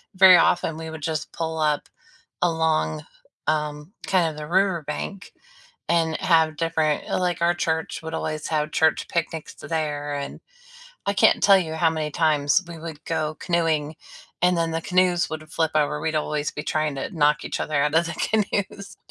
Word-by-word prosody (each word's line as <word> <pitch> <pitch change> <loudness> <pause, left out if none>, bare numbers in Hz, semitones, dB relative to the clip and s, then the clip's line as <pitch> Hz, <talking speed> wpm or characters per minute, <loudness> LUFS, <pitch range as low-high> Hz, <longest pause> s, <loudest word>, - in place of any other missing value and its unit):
Very 185 -1 +9
often, 165 -2 +2
we 160 0 -6
would 160 -1 -8
just 155 0 -3
pull 160 -1 -3
up 150 -1 +1 0.5
along, 160 - +1 0.4
um, 150 +3 -2
kind 180 -4 +3
of 155 - -9
the 150 - -6
riverbank 185 +1 -1 0.6
and 165 -2 +2
have 160 -3 +2
different 160 -2 0
like, 180 -2 0
our 175 +1 +4
church 160 -2 -2
would 160 - -6
always 155 -1 -3
have 150 -1 -1
church 160 0 +2
picnics 165 -2 -3
t - - -11
there. 145 -3 -2
And 140 0 -5 0.7
I 200 - +2
can't - - +4
tell 200 -1 +7
you 160 -4 -3
how 165 +1 +3
many 155 -1 -3
times 150 +2 +2
we 170 - -8
would 160 -1 -9
go 155 -1 -2
canoeing 160 -3 0 0.5
and 180 0 +4
then 165 -1 0
the 165 - -1
canoes 180 0 +2
would 155 0 -6
flip 160 -1 +1
over. 150 0 +1
We'd 160 +1 -2
always 150 -1 -1
be 150 - -6
trying 155 -2 -1
to 135 - -4
knock 150 -1 +3
each - - -4
other 155 - -3
out 150 +1 +1
of 165 +1 +3
the 170 - -4
canoes 200 -2 -2
160 Hz, 180 wpm, -24 LUFS, 150-170 Hz, 0.7 s, Very